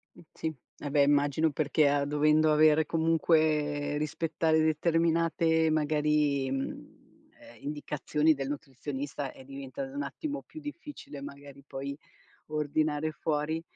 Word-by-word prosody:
M - - -14
sì, 160 -1 -4 0.3
ah 145 - -4
beh, 145 0 +4
immagino 145 +2 +3
perché 150 +1 +2
a 140 0 +2
dovendo 150 +2 +3
avere 155 +1 +5
comunque 155 -2 +1
rispettare 160 +1 +1
determinate 160 0 +2
magari, 150 -3 +1
mhmm, 135 0 -7
ehm, 120 - -15
indicazioni 150 +1 0
del 135 -1 -4
nutrizionista 140 0 -5
è - - -13
diventato 140 - -7
un 285 - -2
attimo 290 -1 -5
più 315 - -11
difficile 295 - -8
magari 140 0 -10
poi 140 +2 -5 0.5
ordinare 155 0 0
fuori. 155 +1 -1
150 Hz, 120 wpm, -29 LUFS, 145-160 Hz, 0.5 s, avere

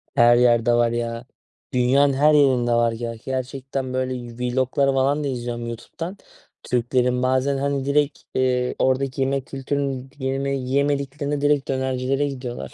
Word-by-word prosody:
Her 120 0 +6
yerde 120 -1 +4
var, 120 -1 +3
ya. 115 0 -3 0.5
Dünyanın 135 +3 +3
her 150 +3 +4
yerinde 130 -5 +3
var. 120 0 +3
Ge 115 0 -5
gerçekten 130 0 -4
böyle 130 0 -1 0.2
vlog'lar 130 +3 +1
falan 140 +3 +1
da 145 - -1
izliyorum 120 -2 -4
YouTube'dan 165 - -7 0.5
Türklerin. 125 +1 0
Bazen, 130 +2 +1
hani, 140 0 -1
direkt, 145 0 +1 0.2
eee, 125 -1 +1
oradaki 130 0 +1
yemek 135 -1 0
kültürünü 135 -1 -3
yeme 135 +1 -1
yiyemediklerinde 140 +2 -1
direkt 145 -1 +2
dönercilere 130 +1 0
gidiyorlar. 125 -3 -6
130 Hz, 135 wpm, -22 LUFS, 125-140 Hz, 0.5 s, Her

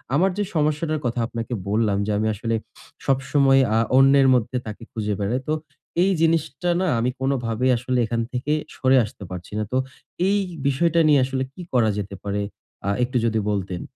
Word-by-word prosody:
আমার 185 +6 +4
যে 205 - +1
সমস্যাটার 155 +1 +1
কথা 120 0 -1
আপনাকে 115 +1 -5 0.2
বললাম 105 -1 +1
যে 105 - -1
আমি 110 +1 0
আসলে 115 +2 -2 0.5
সবসময় 135 0 +3 0.2
আ - - +4 0.2
অন্যের 135 0 +6
মধ্যে 125 +1 +1
তাকে 110 +1 -7
খুঁজে 105 -2 -2
বেড়াই। 110 +6 -1
তো - - +2 0.5
এই 195 - +3
জিনিসটা 165 +2 +1
না 190 - +1
আমি 120 +2 +1
কোনভাবেই 130 -2 0
আসলে 125 +1 -1
এখান 115 +1 -1
থেকে 130 +4 -1 0.2
সরে 130 0 +3
আসতে 105 -1 -11
পারছি 90 -1 -8
না। - - 0
তো 130 - +1 0.5
এই 205 - +3 0.3
বিষয়টা 165 +5 +2
নিয়ে 145 -2 +5
আসলে 130 0 -2
কি 180 - -10
করা 120 -3 +4
যেতে 100 -1 -4
পারে 100 0 -2 0.5
আ - - +2
একটু 125 +1 0
যদি 110 -1 +1
বলতেন। 95 -3 -2
125 Hz, 180 wpm, -23 LUFS, 110-140 Hz, 0.5 s, অন্যের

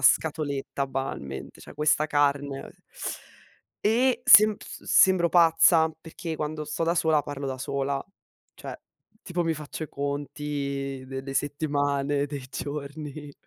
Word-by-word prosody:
scatoletta 140 0 +1
banalmente, 130 - -5
cioè - - -12
questa 150 0 +2
carne?" 140 -2 0 1.2
E 245 +3 +3
semp 215 0 +7
se - - -10
sembro 185 -2 +5
pazza 165 -1 +5
perché 165 0 -6
quando 155 0 -3
sto 150 +2 -2
da 170 +1 +1
sola 160 -3 +3
parlo 140 -1 -5
da 130 -1 -4
sola, 140 +1 -2 0.5
cioè - - -8 0.5
tipo 175 -1 -2
mi 165 - +1
faccio 155 0 -7
i 155 - -4
conti 140 -1 -3
dei 135 0 -5
de 135 0 -6
settimane, 145 -1 0
dei 140 -3 -6
giorni. 145 0 -6
145 Hz, 130 wpm, -26 LUFS, 140-160 Hz, 1.2 s, semp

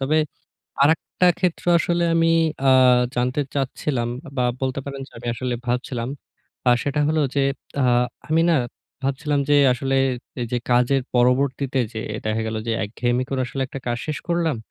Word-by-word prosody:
তবে 150 +4 +2 0.6
আরেকটা 160 +4 +2
ক্ষেত্রে 175 -1 -1
আসলে 175 0 +1
আমি 165 0 +3 0.4
আ - - +7 0.5
জানতে 125 +4 0
চাচ্ছিলাম 130 -2 -1 0.3
বা 125 - +1 0.2
বলতে 130 +1 -1
পারেন 140 -1 -6
যে - - -27
আমি 120 - -9
আসলে 125 0 -2
ভাবছিলাম 120 0 -2 0.6
আ - - +7
সেটা 145 +1 -1
হলো 155 0 +2
যে, 140 - +2 0.4
আ-ট 125 -1 +3 0.2
আমি 165 +1 +4
না 165 - +4 0.5
ভাবছিলাম 140 +1 0
যে 145 - +6 0.2
আসলে 135 +2 -1 0.6
যে 120 - +2
কাজের 125 +2 +3
পরবর্তীতে 130 +2 +2
যে 110 - -4 0.3
দেখা 110 +1 0
গেল 110 0 -3
যে - - +1
একঘেয়েমি 120 +4 -1
করে 135 -1 -2
আসলে 135 +1 -3
একটা 135 0 -8
কাজ 120 0 -1
শেষ 155 - -2
করলাম। 170 -5 +1
135 Hz, 160 wpm, -22 LUFS, 125-150 Hz, 0.6 s, আ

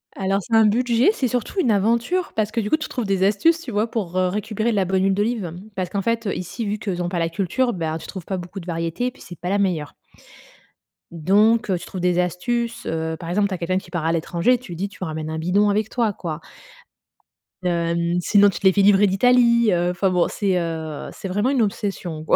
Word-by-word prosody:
Alors, 195 +1 0
c'est 225 - -1
un 225 -1 +6
budget, 235 - +3
c'est 265 - -1
surtout 245 - -2
une 245 -11 +3
aventure, 235 - +1
parce 215 -1 0
que, 230 - -1
du 210 -2 -2
coup, 310 - +3
tu 310 - -5
trouves 245 -4 -3
des 195 -1 +1
astuces, 265 +12 +3
tu 265 -7 -7
vois? 215 +2 0
Pour, 185 -6 -3
heu, 185 0 +3
récupérer 210 +4 -2
de - - -1
la 195 -2 +2
bonne 190 +1 +1
huile 195 0 +3
d'olive. 205 -4 -1 0.2
Parce 185 -2 -2
qu'en 195 0 -2
fait, 230 0 -1
heu, 195 - -1
ici, 220 +5 -5
vu 210 +1 -1
qu'ils 195 -4 -3
ont 175 - -1
pas 180 - -3
la 165 0 0
culture, 210 +8 0
ben, 160 -3 -2
tu - - -10
trouves 190 -4 -7
pas 190 - -3
beaucoup 180 +2 -7
de 175 - -11
variétés, 165 +7 -2
et - - -2
puis - - -16
c'est 175 - -11
pas 180 +1 -4
la 200 - +2
meilleure 175 -7 -1 1.2
donc 205 +8 +3
heu, 185 - +2
tu - - -9
trouves 185 - -6
des 180 0 +2
astuces, 230 +7 -2
heu, 160 0 -2
par 165 - -7
exemple, 200 +3 +2
tu 195 - -5
as - - -2
quelqu'un 180 +2 -1
qui - - -7
part 165 -3 -2
à 165 - +2
l'étranger, 170 +8 +1
tu 240 -6 -12
lui - - -5
dis: 195 +4 -3
«Tu 195 - -9
ramènes 155 -2 -4
un 160 - -3
bidon 185 +6 +2
avec 210 +1 0
toi», 230 -5 0
quoi 165 -3 -5 1.2
hem, 170 -1 0
sinon 205 +3 +5
tu 195 - -5
te - - -6
les 190 - +5
fais 200 - +3
livrer 205 +1 +5
d'Italie, 235 +2 +4
heu, 175 0 +1
enfin 185 +2 +1
bon, 180 -1 +2
c'est, 195 -3 0
heu, 160 -3 -4
c'est 195 - -7
vraiment 205 +7 +1
une 270 -3 +2
obsession, 195 -6 -3
quoi. - - +3
195 Hz, 250 wpm, -22 LUFS, 175-220 Hz, 1.2 s, un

